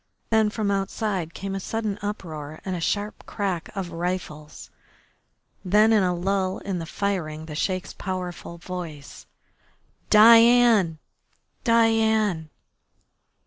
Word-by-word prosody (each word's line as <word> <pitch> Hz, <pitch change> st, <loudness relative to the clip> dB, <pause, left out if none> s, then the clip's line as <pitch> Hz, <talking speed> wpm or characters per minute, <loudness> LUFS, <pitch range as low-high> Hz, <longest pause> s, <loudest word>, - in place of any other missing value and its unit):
Then 220 Hz, -1 st, +4 dB
from 210 Hz, -1 st, -2 dB
outside 195 Hz, -3 st, -2 dB
came 195 Hz, 0 st, -5 dB
a 195 Hz, -, -2 dB
sudden 215 Hz, 0 st, -3 dB
uproar 155 Hz, -7 st, -6 dB
and 190 Hz, -, -2 dB
the 170 Hz, -, -5 dB
sharp 205 Hz, +5 st, -2 dB
crack 190 Hz, -4 st, -3 dB
of 185 Hz, -3 st, -4 dB
rifles. 165 Hz, -3 st, -5 dB, 0.9 s
Then 210 Hz, +4 st, +4 dB
in 215 Hz, -, +4 dB
a 180 Hz, -1 st, +2 dB
lull 185 Hz, +1 st, -1 dB
in 190 Hz, -3 st, -4 dB
the 165 Hz, -, -6 dB
firing 160 Hz, -6 st, -3 dB
the 155 Hz, -, -8 dB
Sheik's 185 Hz, +4 st, -2 dB
powerful 180 Hz, -2 st, -6 dB
voice: 170 Hz, -5 st, -8 dB, 0.8 s
"Diane! 230 Hz, -5 st, +6 dB, 0.7 s
Diane!" 220 Hz, -7 st, +2 dB
190 Hz, 115 wpm, -24 LUFS, 170-210 Hz, 0.9 s, Diane